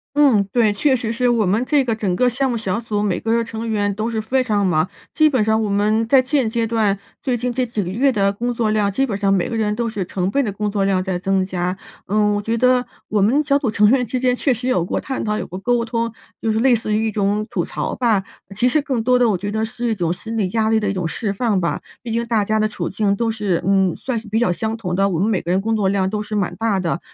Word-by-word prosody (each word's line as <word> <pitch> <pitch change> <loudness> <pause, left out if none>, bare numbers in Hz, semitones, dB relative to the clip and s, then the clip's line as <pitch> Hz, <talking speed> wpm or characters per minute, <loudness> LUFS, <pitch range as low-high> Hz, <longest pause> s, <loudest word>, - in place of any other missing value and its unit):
嗯， 275 -9 +5
对， 225 -4 +3
确 265 +7 +2
实 230 -3 -1
是 245 +1 +1
我 230 -3 +2
们 205 +6 +1
这 280 0 +2
个 230 -2 0
整 205 -4 -1
个 250 - +3
项 260 +2 0
目 235 - -1
小 215 +1 -2
组 210 -3 -2
每 205 -3 0
个 230 +1 0
成 225 0 -5
员 205 -2 0
都 220 +2 -2
是 225 - -1
非 255 +5 0
常 210 -5 +1
忙， 160 -1 +1 0.2
基 310 -1 +4
本 260 -5 +1
上 220 +1 +2
我 210 - -1
们 210 +3 +1
在 260 +3 +5
现 255 -2 0
阶 230 0 -1
段， 215 -3 +1 0.2
最 255 -4 0
近 245 +1 -2
这 255 +1 0
几 225 -3 -3
个 175 - -4
月 255 +9 +2
的 200 -4 +1
工 240 +4 -2
作 230 -2 0
量 210 -2 +1
基 270 +7 +1
本 215 -7 -3
上 200 -1 +2
每 185 -3 +1
个 230 - -4
人 215 -2 0
都 235 +2 -2
是 210 -3 -3
成 180 +1 -2
倍 280 +7 +1
的 215 - -2
工 210 +1 -2
作 200 -1 0
量 195 -1 +1
在 185 -1 -2
增 190 +1 0
加。 180 0 -2 0.3
嗯， 210 +1 +2
我 205 - -1
觉 225 +3 -1
得 250 +1 +3 0.2
我 210 -1 +1
们 240 +9 +3
小 280 0 +3
组 260 -6 -1
成 210 0 +4
员 250 +1 +3
之 250 +3 -2
间 250 0 +2
确 265 +1 +1
实 245 +2 -5
有 250 -10 +2
过 175 - -2
探 265 - -4
讨、 210 -1 -1
有 - - -4
过 185 - -7
沟 235 +4 0
通， 230 0 -2 0.3
就 225 - 0
是 220 - 0
类 250 +1 +4
似 215 -1 -2
于 220 +1 +1
一 - - -1
种 210 +1 0
吐 - - -1
槽 - - -4
吧， 225 -6 +2 0.3
其 215 +5 +1
实 295 +4 +2
更 265 -6 -1
多 250 +2 +3
的 245 -2 +3
我 195 - +1
觉 205 +3 -4
得 220 +1 -1
是 235 +2 -3
一 - - 0
种 170 -4 -1
心 225 +6 -5
理 195 -4 0
压 220 +2 +1
力 225 - +3
的 210 -2 0
一 - - -1
种 180 -3 -2
释 200 +5 -2
放 205 -2 0
吧。 170 - -1 0.2
毕 235 - -6
竟 230 +1 -1
大 225 -3 +1
家 215 +2 0
的 215 - +2
处 215 - -4
境 205 -2 0
都 225 +2 0
是 205 -6 -1
嗯， 190 -2 +2
算 255 -3 -3
是 220 - -13
比 215 +2 0
较 185 - +2
相 220 +5 -2
同 195 -6 -4
的， 195 +2 +2
我 185 -4 -1
们 200 +6 +1
每 205 -5 +1
个 170 - -3
人 185 +2 +2
工 225 +3 -1
作 210 -3 +1
量 190 -1 +1
都 210 +1 -2
是 210 0 -5
蛮 200 -4 -1
大 220 -4 0
的， 170 -1 -1
220 Hz, 315 characters per minute, -20 LUFS, 200-235 Hz, 0.3 s, 嗯